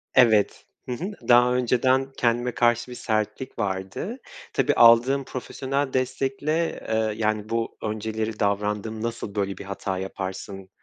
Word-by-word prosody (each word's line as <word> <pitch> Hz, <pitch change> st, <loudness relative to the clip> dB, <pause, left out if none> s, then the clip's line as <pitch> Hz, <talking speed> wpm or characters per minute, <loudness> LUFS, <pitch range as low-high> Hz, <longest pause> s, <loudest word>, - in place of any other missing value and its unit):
Evet, 110 Hz, -5 st, +4 dB, 0.2 s
hı -, -, -6 dB
hı. 140 Hz, +9 st, -3 dB, 0.2 s
Daha 125 Hz, +1 st, +6 dB
önceden 130 Hz, +2 st, +2 dB
kendime 120 Hz, +1 st, +1 dB
karşı 120 Hz, +1 st, +2 dB
bir -, -, -6 dB
sertlik 110 Hz, +3 st, -2 dB
vardı. 95 Hz, -, -3 dB, 0.4 s
Tabii, -, -, +2 dB
aldığım 120 Hz, +4 st, +6 dB
profesyonel 135 Hz, +2 st, -3 dB
destekle, 135 Hz, +5 st, -1 dB
eee, 110 Hz, -1 st, +1 dB
yani, 110 Hz, -1 st, -1 dB
bu 115 Hz, 0 st, -2 dB
önceleri 110 Hz, 0 st, -3 dB
davrandığım 105 Hz, +2 st, -1 dB
nasıl 115 Hz, -3 st, -4 dB
böyle 100 Hz, -2 st, -1 dB
bir -, -, -7 dB
hata 95 Hz, -1 st, -3 dB
yaparsın, 95 Hz, 0 st, -6 dB
115 Hz, 135 wpm, -25 LUFS, 105-125 Hz, 0.4 s, Daha